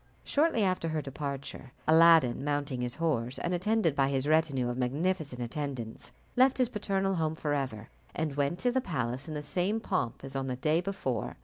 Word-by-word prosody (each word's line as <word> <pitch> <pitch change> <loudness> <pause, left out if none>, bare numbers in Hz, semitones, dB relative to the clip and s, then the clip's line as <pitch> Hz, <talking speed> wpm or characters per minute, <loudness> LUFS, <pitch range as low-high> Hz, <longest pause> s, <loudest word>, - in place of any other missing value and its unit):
Shortly 290 -6 +2
after 185 -3 0
her 155 -1 -1
departure, 140 -1 -6 0.2
Aladdin, 160 -6 +6
mounting 145 -3 -1
his 125 -1 -2
horse, 135 -7 -1
and 175 - -2
attended 185 -3 +1
by 135 -1 +3
his 135 0 0
retinue 155 -5 +2
of 120 - -2
magnificent 140 +1 -1
attendants, 120 -3 -4 0.2
left 260 +1 +5
his 255 -3 +2
paternal 195 -3 0
home 160 -3 0
forever, 135 -8 -2 0.3
and 155 -2 -1
went 145 +4 0
to 245 - +3
the 260 +1 +1
palace 130 - -3
in 155 - -5
the 150 - -4
same 185 +8 0
pomp 185 - -2
as 135 0 -6
on 135 0 -1
the 130 - -2
day 155 +6 +1
before. 175 - -3
150 Hz, 185 wpm, -30 LUFS, 130-180 Hz, 0.3 s, Aladdin